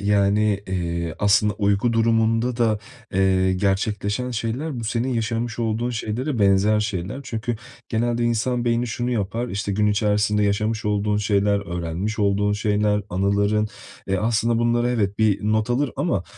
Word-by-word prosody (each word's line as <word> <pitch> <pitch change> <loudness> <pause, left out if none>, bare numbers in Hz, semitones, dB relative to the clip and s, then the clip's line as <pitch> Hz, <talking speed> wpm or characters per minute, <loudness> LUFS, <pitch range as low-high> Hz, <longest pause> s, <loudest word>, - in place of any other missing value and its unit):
yani, 100 0 +2
iii, 85 -3 -2
aslında 105 +1 +3
uyku 100 +3 +1
durumunda 115 +1 +2
da, 110 -3 +2 0.4
eee, 95 -1 +3
gerçekleşen 100 +5 -1
şeyler, 120 +4 -3
bu - - -5
senin 115 +3 -1
yaşamış 115 +1 -2
olduğun 115 +1 -1
şeylere 120 +4 -3
benzer 100 +1 +3
şeyler. 105 +4 -3
Çünkü 115 +1 -3 0.3
genelde 120 +1 0
insan 120 +1 0
beyni 120 +1 +1
şunu 120 +2 -2
yapar, 115 +1 -2
işte 100 0 -3
gün 105 +2 +1
içerisinde 105 0 +2
yaşamış 105 +2 0
olduğun 105 0 0
şeyler, 100 -1 +1
öğrenmiş 90 +6 -3
olduğun 105 0 +2
şeyler, 105 0 +1
anıların, 100 +3 +1 0.4
eee, 95 - +1
aslında 115 +3 +1
bunlara, 120 +1 +2
evet, 105 -4 -1
bir 110 -3 +3
not 110 +2 +1
alır, 130 +2 +1
ama, - - 0
105 Hz, 145 wpm, -23 LUFS, 100-115 Hz, 0.4 s, aslında